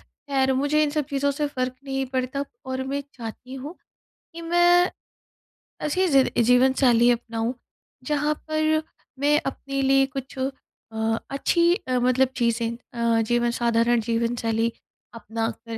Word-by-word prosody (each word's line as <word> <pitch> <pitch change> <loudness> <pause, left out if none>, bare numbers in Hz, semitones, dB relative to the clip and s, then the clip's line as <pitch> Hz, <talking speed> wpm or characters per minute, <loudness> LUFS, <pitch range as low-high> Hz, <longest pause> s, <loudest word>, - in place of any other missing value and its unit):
खैर, 265 -2 -1
मुझे 290 +3 +2
इन 295 - +1
सब 300 0 -1
चीज़ों 280 0 +1
से 295 +1 -1
फ़र्क 255 -2 -3
नहीं 270 -1 -2
पड़ता, 260 +2 -1 0.2
और 260 0 -3
मैं 280 +1 -3
चाहती 245 +2 -8
हूँ 280 +5 -7 0.6
कि 335 - -7
मैं 350 +1 +5 1.0
ऐसी 370 +5 +1
ज़िद 275 -5 +4
जीवनशैली 250 -1 +4
अपनाऊँ, 230 0 -2 0.5
जहाँ 295 +1 0 0.2
पर 310 0 +1 0.4
मैं 295 +2 +3
अपने 275 0 -3
लिए 270 0 +4
कुछ 265 0 -6
अ, 225 -4 -4
अच्छी 340 +5 +3
अ, 255 - -2
मतलब 255 +2 +3
चीज़ें 235 -1 +1 0.5
अ, - - +3
जीवन 240 +1 +1
साधारण 235 0 +3
जीवनशैली 230 0 0 0.4
अपनाकर 225 +1 -4
265 Hz, 135 wpm, -24 LUFS, 235-285 Hz, 1.0 s, मैं